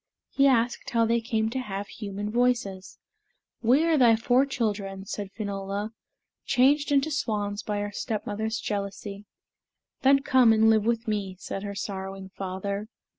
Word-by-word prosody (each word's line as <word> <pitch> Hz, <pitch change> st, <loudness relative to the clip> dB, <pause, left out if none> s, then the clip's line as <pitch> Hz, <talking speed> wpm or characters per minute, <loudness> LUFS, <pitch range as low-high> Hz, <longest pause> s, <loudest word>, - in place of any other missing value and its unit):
He 275 Hz, 0 st, +4 dB
asked 240 Hz, -2 st, +1 dB
how 230 Hz, -1 st, +2 dB
they 235 Hz, +1 st, +2 dB
came 220 Hz, -1 st, -1 dB
to 260 Hz, -, -2 dB
have 200 Hz, -4 st, -4 dB
human 205 Hz, -1 st, -5 dB
voices. 235 Hz, -6 st, 0 dB, 0.6 s
"We 260 Hz, +7 st, +4 dB
are 325 Hz, -3 st, +3 dB
thy 235 Hz, -3 st, +6 dB
four 245 Hz, +4 st, +3 dB
children," 200 Hz, -6 st, -2 dB
said 200 Hz, -1 st, -5 dB
Finola, 200 Hz, 0 st, -4 dB, 0.5 s
"changed 285 Hz, +4 st, +3 dB
into 285 Hz, +2 st, +2 dB
swans 210 Hz, -6 st, -1 dB
by 210 Hz, -2 st, -2 dB
our 205 Hz, 0 st, -3 dB
stepmother's 220 Hz, +1 st, -3 dB
jealousy." 200 Hz, 0 st, -5 dB, 0.7 s
"Then 275 Hz, +1 st, +5 dB
come 255 Hz, -5 st, +5 dB
and 220 Hz, 0 st, +5 dB
live 215 Hz, -1 st, +3 dB
with 230 Hz, 0 st, 0 dB
me," 200 Hz, -3 st, -2 dB
said 195 Hz, -, -5 dB
her 200 Hz, 0 st, -5 dB
sorrowing 195 Hz, -1 st, -5 dB
father. 200 Hz, +2 st, -4 dB
215 Hz, 150 wpm, -27 LUFS, 200-240 Hz, 0.7 s, thy